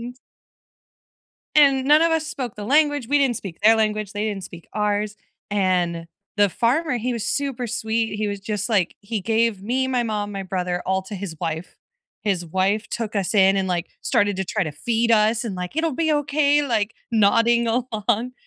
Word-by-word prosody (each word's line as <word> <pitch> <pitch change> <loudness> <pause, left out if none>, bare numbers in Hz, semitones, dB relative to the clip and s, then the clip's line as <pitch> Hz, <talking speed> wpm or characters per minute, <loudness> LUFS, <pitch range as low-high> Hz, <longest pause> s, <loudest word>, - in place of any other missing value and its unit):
And 245 +2 -8 1.4
and 275 -3 +5
none 300 +3 +5
of 335 - +3
us 320 -1 0
spoke 260 -7 -5
the 210 - -7
language- 290 0 +2
we 290 +1 +3
didn't 265 -4 +2
speak 190 -5 -7
their 225 +1 +6
language, 215 -2 -1
they 205 +1 -2
didn't 200 -3 -3
speak 170 -2 -11
ours- 210 0 -1 0.3
and 180 -4 0 0.3
the 205 -1 +4
farmer, 250 - 0
he 245 +3 -2
was 230 -2 -3
super 270 -4 -2
sweet, 225 -1 -1
he 210 0 -1
was 200 0 -4
just 210 +1 -3
like, 200 -7 +1
he 210 0 -4
gave 225 0 +1
me, 255 +5 -1
my 250 -2 0
mom, 210 -2 -2
my 195 -1 -5
brother 180 -1 -2
all 190 0 0
to 200 +1 -7
his 185 -4 -6
wife. 165 0 -4 0.5
His 190 -5 -1
wife 190 +6 0
took 220 -3 -4
us 195 +2 -1
in 195 -1 +5
and, 190 -1 0
like, 175 0 -1 0.2
started 205 -6 +1
to 190 - -2
try 210 +3 -1
to 155 - -3
feed 230 +10 -1
us 220 +1 +3
and, 210 - -4
like, 180 +8 -5
"It'll 320 -3 0
be 315 0 +1
okay," 290 0 +2
like, 225 -5 -1 0.2
nodding 230 +2 +3
along. 235 0 -1
215 Hz, 195 wpm, -22 LUFS, 195-245 Hz, 1.4 s, their